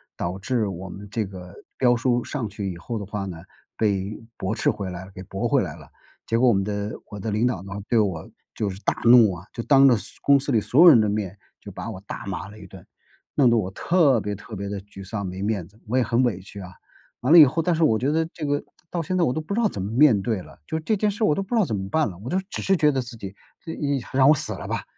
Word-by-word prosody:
导 90 Hz, +3 st, -4 dB
致 115 Hz, +1 st, 0 dB
我 95 Hz, 0 st, -6 dB
们 100 Hz, +3 st, -9 dB
这 110 Hz, -2 st, -1 dB
个 90 Hz, -2 st, -10 dB, 0.2 s
标 125 Hz, -2 st, +4 dB
书 120 Hz, 0 st, +1 dB
上 130 Hz, -7 st, -4 dB
去 100 Hz, -1 st, -4 dB
以 85 Hz, -, -8 dB
后 115 Hz, +6 st, -5 dB
的 100 Hz, -, -5 dB
话 100 Hz, 0 st, -4 dB
呢， 90 Hz, -4 st, -6 dB, 0.4 s
被 100 Hz, -1 st, 0 dB, 0.2 s
驳 95 Hz, -, -2 dB
斥 -, -, +1 dB
回 100 Hz, -2 st, -3 dB
来 90 Hz, +1 st, -8 dB
给 95 Hz, -, -9 dB
驳 95 Hz, +1 st, -3 dB
回 -, -, +3 dB
来 -, -, -4 dB
了， -, -, -15 dB, 0.4 s
结 115 Hz, 0 st, 0 dB
果 130 Hz, -, +4 dB
我 120 Hz, -, +5 dB
们 95 Hz, 0 st, +1 dB
的 105 Hz, +1 st, -3 dB, 0.2 s
我 105 Hz, -, -8 dB
的 110 Hz, +3 st, -4 dB
领 105 Hz, +3 st, +1 dB
导 115 Hz, -8 st, -1 dB
呢， 100 Hz, +1 st, -8 dB, 0.2 s
对 115 Hz, -, +3 dB
我 95 Hz, -7 st, -1 dB, 0.3 s
就 105 Hz, -, -1 dB
是 95 Hz, 0 st, -7 dB
大 -, -, +1 dB
怒 115 Hz, -4 st, +7 dB
啊， 90 Hz, +1 st, -10 dB
就 115 Hz, -, -4 dB
当 140 Hz, +1 st, +6 dB
着 125 Hz, -3 st, +5 dB
所 -, -, -9 dB
公 140 Hz, -1 st, +5 dB
司 140 Hz, -, -5 dB
里 110 Hz, -4 st, +3 dB
所 135 Hz, +9 st, +3 dB
有 -, -, +9 dB
人 145 Hz, -9 st, +9 dB
的 105 Hz, -, +1 dB
面， 100 Hz, -2 st, -3 dB, 0.2 s
就 -, -, -10 dB
把 -, -, -6 dB
我 95 Hz, -, -8 dB
大 -, -, -6 dB
骂 95 Hz, -3 st, -5 dB
了 105 Hz, -, -13 dB
一 100 Hz, -, -11 dB
顿， 95 Hz, -1 st, -13 dB, 0.5 s
弄 130 Hz, -4 st, +5 dB
得 115 Hz, -, +3 dB
我 95 Hz, -4 st, -1 dB
特 145 Hz, -, +3 dB
别 105 Hz, -, -3 dB
特 105 Hz, +2 st, -9 dB
别 100 Hz, 0 st, -5 dB
地 100 Hz, 0 st, -4 dB
沮 95 Hz, 0 st, -12 dB
丧， 100 Hz, -2 st, -4 dB
没 95 Hz, +1 st, -6 dB
面 100 Hz, -5 st, -2 dB
子， 105 Hz, +4 st, -23 dB
我 125 Hz, -, +1 dB
也 130 Hz, -, +4 dB
很 120 Hz, +2 st, +1 dB
委 110 Hz, -7 st, 0 dB
屈 100 Hz, +1 st, -10 dB
啊。 90 Hz, -1 st, -9 dB, 0.5 s
完 130 Hz, +5 st, 0 dB
了 170 Hz, -, +10 dB
以 150 Hz, -, +11 dB
后 155 Hz, +5 st, 0 dB
但 175 Hz, +1 st, +1 dB
是 165 Hz, -, +1 dB
我 110 Hz, -7 st, +3 dB
觉 130 Hz, +6 st, 0 dB
得 160 Hz, +1 st, +1 dB
这 155 Hz, -, -5 dB
个 145 Hz, 0 st, 0 dB, 0.3 s
到 175 Hz, -, -1 dB
现 185 Hz, +3 st, -2 dB
在 175 Hz, -, +3 dB
我 125 Hz, -, +2 dB
都 155 Hz, -, -2 dB
不 155 Hz, +6 st, -5 dB
知 235 Hz, -, +1 dB
道 -, -, +2 dB
怎 95 Hz, -, -5 dB
么 100 Hz, -, -3 dB
面 125 Hz, -5 st, +5 dB
对 105 Hz, -2 st, -2 dB
了， -, -, -15 dB
就 160 Hz, -, -2 dB
这 215 Hz, +7 st, 0 dB
件 210 Hz, +1 st, +1 dB
事 205 Hz, +2 st, -3 dB
儿 -, -, +4 dB
我 -, -, +3 dB
都 195 Hz, -, -1 dB
不 195 Hz, +5 st, -3 dB
知 230 Hz, -, +4 dB
道 -, -, +4 dB
怎 115 Hz, -, -4 dB
么 95 Hz, -1 st, -4 dB
办 160 Hz, +6 st, +2 dB
了， 90 Hz, -, -10 dB
我 105 Hz, +7 st, -8 dB
就 180 Hz, -, 0 dB
只 -, -, -5 dB
是 195 Hz, -, +2 dB
觉 150 Hz, -4 st, +3 dB
得 135 Hz, -2 st, -1 dB
自 120 Hz, -1 st, -8 dB
己 100 Hz, -4 st, -8 dB, 0.3 s
一 145 Hz, -4 st, -2 dB
让 130 Hz, 0 st, +4 dB
我 155 Hz, -, +7 dB
死 -, -, 0 dB
了 -, -, -7 dB
吧， -, -, -3 dB
110 Hz, 320 characters per minute, -24 LUFS, 95-140 Hz, 0.5 s, 以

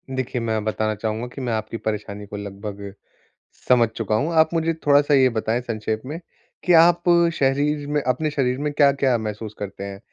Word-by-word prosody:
देखिए, 130 Hz, -1 st, -2 dB
मैं 110 Hz, -2 st, -1 dB
बताना 110 Hz, 0 st, -1 dB
चाहूँगा 110 Hz, +3 st, -3 dB
कि 130 Hz, +2 st, -9 dB
मैं 120 Hz, -3 st, -2 dB
आपकी 110 Hz, +1 st, -3 dB
परेशानी 105 Hz, -2 st, -4 dB
को 105 Hz, 0 st, -8 dB
लगभग 100 Hz, 0 st, -7 dB, 0.7 s
समझ 120 Hz, -2 st, +5 dB
चुका 110 Hz, -1 st, -2 dB
हूँ। 150 Hz, +10 st, 0 dB
आप 160 Hz, -, +5 dB
मुझे 165 Hz, 0 st, +1 dB
थोड़ा-सा 145 Hz, 0 st, +4 dB
ये 130 Hz, -2 st, +5 dB
बताएँ 115 Hz, +1 st, -1 dB
संक्षेप 110 Hz, -2 st, -3 dB
में, 150 Hz, +5 st, -5 dB, 0.4 s
कि 180 Hz, -, +3 dB
आप 170 Hz, +1 st, +6 dB, 0.3 s
शरीर 145 Hz, +1 st, 0 dB
में 150 Hz, 0 st, 0 dB
अपने 130 Hz, +4 st, 0 dB
शरीर 130 Hz, -3 st, 0 dB
में 150 Hz, 0 st, -1 dB
क्या-क्या 140 Hz, -3 st, +3 dB
महसूस 110 Hz, -1 st, -5 dB
करते 100 Hz, -1 st, -6 dB
हैं, 100 Hz, 0 st, -7 dB
120 Hz, 185 wpm, -22 LUFS, 110-145 Hz, 0.7 s, आप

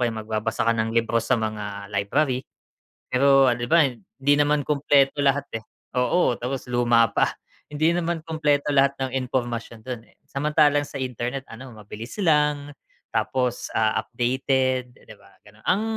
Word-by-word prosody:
kaya 120 Hz, -2 st, +1 dB
magbabasa 110 Hz, +1 st, -2 dB
ka 115 Hz, -, +3 dB
ng 115 Hz, 0 st, -2 dB
libro 115 Hz, 0 st, +2 dB
sa 115 Hz, -, +1 dB
mga 105 Hz, -2 st, -5 dB
library. 125 Hz, +7 st, 0 dB, 0.7 s
Pero, 135 Hz, +1 st, +5 dB
'di 120 Hz, -, -5 dB
ba, 165 Hz, -4 st, +6 dB
hindi 135 Hz, +4 st, -2 dB
naman 145 Hz, -1 st, +1 dB
kumpleto 140 Hz, -1 st, +2 dB
lahat, 140 Hz, 0 st, +2 dB
eh. 110 Hz, -, -4 dB, 0.3 s
Oo. 125 Hz, +2 st, +2 dB
Tapos 125 Hz, +1 st, -4 dB
luma 120 Hz, -1 st, +4 dB
pa. -, -, +3 dB, 0.4 s
Hindi 155 Hz, +3 st, +1 dB
naman 170 Hz, -1 st, -1 dB
kumpleto 150 Hz, -3 st, 0 dB
lahat 140 Hz, 0 st, +3 dB
ng 130 Hz, -, -3 dB, 0.2 s
impormasyon 120 Hz, -3 st, -3 dB
do'n, 120 Hz, -3 st, -7 dB
eh. -, -, -27 dB
Samantalang 145 Hz, +1 st, +2 dB
sa -, -, -13 dB
internet, 125 Hz, +2 st, -4 dB
ano, 120 Hz, +1 st, -10 dB
mabilis 110 Hz, +2 st, -9 dB
lang 150 Hz, -3 st, +2 dB, 0.4 s
tapos, 125 Hz, +2 st, -1 dB
ah, 110 Hz, -1 st, +2 dB
updated, 130 Hz, +1 st, -1 dB
'di 110 Hz, -, -15 dB
ba, 100 Hz, 0 st, -21 dB
gano'n. 105 Hz, +1 st, -19 dB
Ang 195 Hz, +4 st, +2 dB
130 Hz, 155 wpm, -24 LUFS, 115-145 Hz, 0.7 s, ba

